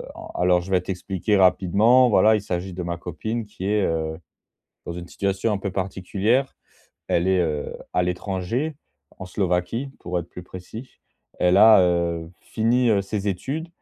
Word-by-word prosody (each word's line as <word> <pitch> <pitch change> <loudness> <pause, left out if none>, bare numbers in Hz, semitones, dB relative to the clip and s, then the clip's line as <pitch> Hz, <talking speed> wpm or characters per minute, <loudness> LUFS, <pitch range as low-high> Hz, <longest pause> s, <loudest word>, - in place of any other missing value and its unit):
en - - -9
alors 90 0 +3
je 95 +2 -9
vais 90 - +4
t'expliquer 95 +2 -1
rapidement, 100 +7 +4
voilà, 110 +2 +5
il 105 - -1
s'agit 90 -1 -4
de 90 - -5
ma 85 0 -3
copine 110 +7 -4
qui 100 -2 -8
est, 105 0 +2
heu, 80 -2 -2 0.7
dans 85 - -5
une 90 0 -8
situation 100 +3 -1
un 100 - 0
peu 100 - -3
particulière. 100 +7 -1 0.5
Elle 85 +2 +1
est, 95 -1 +3
heu, 75 -4 -2 0.2
à 90 - +3
l'étranger, 95 - -2 0.4
en - - -7
Slovaquie 95 +7 -1
pour 90 0 -2
être 85 - -6
plus 90 - -9
précis. 95 +8 -10 0.4
Elle 90 +1 +3
a, 110 -1 +8
heu, 85 -2 0
fini, 120 +2 +1
heu, 100 -2 +3
ses 100 0 -3
études 135 - -3
95 Hz, 170 wpm, -23 LUFS, 90-110 Hz, 0.7 s, a